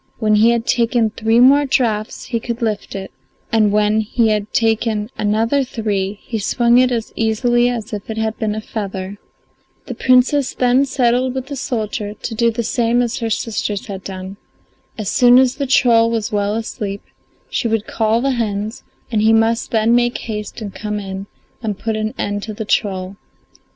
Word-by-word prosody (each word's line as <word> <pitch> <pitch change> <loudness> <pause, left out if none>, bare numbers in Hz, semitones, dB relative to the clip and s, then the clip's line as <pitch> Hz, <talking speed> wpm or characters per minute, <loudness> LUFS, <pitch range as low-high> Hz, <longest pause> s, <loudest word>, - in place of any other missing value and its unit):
When 215 -2 +2
he 220 +2 +5
had 235 -1 +1
taken 235 -2 +2
three 225 +2 +2
more 280 +3 +6
draughts 220 -5 0
he 235 - -2
could 235 +1 -4
lift 210 -3 -2
it, 195 0 -6 0.4
and 215 -3 +3
when 210 +1 +2
he 225 +1 +1
had 210 -1 -1
taken 225 -1 0
another 225 +6 +1
three 205 -5 -2
he 225 - -4
swung 235 +4 +3
it 255 0 +3
as 230 -2 -3
easily 240 +2 +2
as 230 -3 -5
if 205 +1 -6
it 220 - -4
had 220 0 -1
been 215 -2 -1
a 215 - -4
feather. 200 -2 -5 0.7
The - - -5
Princess 255 +2 +2
then 255 +2 +3
settled 255 0 +1
with 260 -1 -3
the 285 - -4
soldier 215 -4 -3
to 225 - -6
do 235 +1 +2
the 230 +1 -2
same 235 +2 +1
as 240 +1 -2
her 230 -2 -2
sisters 210 -2 -2
had 195 -3 -7
done. 190 0 -7 0.6
As 215 -3 -4
soon 245 0 +6
as 260 0 +3
the 280 -1 -2
troll 230 -3 +4
was 225 -2 -2
well 205 0 0
asleep 205 -3 -4 0.4
she - - -1
would 220 -1 0
call 225 +1 +1
the 275 +1 +1
hens, 215 -3 -3 0.3
and 215 -2 +1
he 220 +1 +4
must 225 +1 +2
then 225 0 +2
make 240 0 +2
haste 210 0 -6
and 200 -3 -6
come 210 -1 -4
in 195 0 -6 0.3
and 210 -4 -3
put 225 +1 -2
an 215 0 -3
end 205 0 -2
to 215 0 -6
the 220 - -5
troll. 190 -2 -1
225 Hz, 190 wpm, -18 LUFS, 210-240 Hz, 0.7 s, more